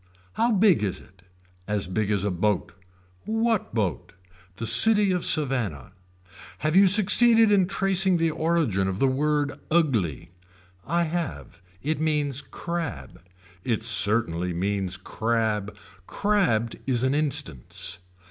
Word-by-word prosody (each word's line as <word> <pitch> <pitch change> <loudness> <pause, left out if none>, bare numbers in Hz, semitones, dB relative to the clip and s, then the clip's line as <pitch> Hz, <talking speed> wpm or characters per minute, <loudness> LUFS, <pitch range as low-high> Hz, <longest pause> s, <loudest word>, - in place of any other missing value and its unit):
How 235 +2 0
big 195 - +3
is 95 -3 -3
it. 95 -1 -21 0.5
As 105 -3 -2
big 100 +3 -2
as 100 -2 0
a 100 - -1
boat. 95 +2 -2 0.5
What 225 -1 -1
boat. 100 -6 -3 0.4
The 115 - -6
city 200 - +6
of 180 -2 -1
Savannah. 125 - -1 0.7
Have 155 +2 -2
you 195 +1 +6
succeeded 220 +3 +5
in 195 -3 +3
tracing 190 -1 +1
the 165 -1 0
origin 155 - -1
of 95 -1 -3
the 135 - +2
word 145 +2 -1 0.2
ugly. 120 - -1 0.6
I 170 +4 0
have. 150 - -5 0.2
It 155 +1 -2
means 145 -3 -1
crab. 155 - -7 0.4
It 115 -3 -2
certainly 100 -5 +2
means 95 +1 -1
crab. 105 0 -3 0.3
Crabbed 180 - 0
is 125 -2 +1
an 130 +1 +1
instance. 135 - -1
135 Hz, 130 wpm, -24 LUFS, -, 0.7 s, city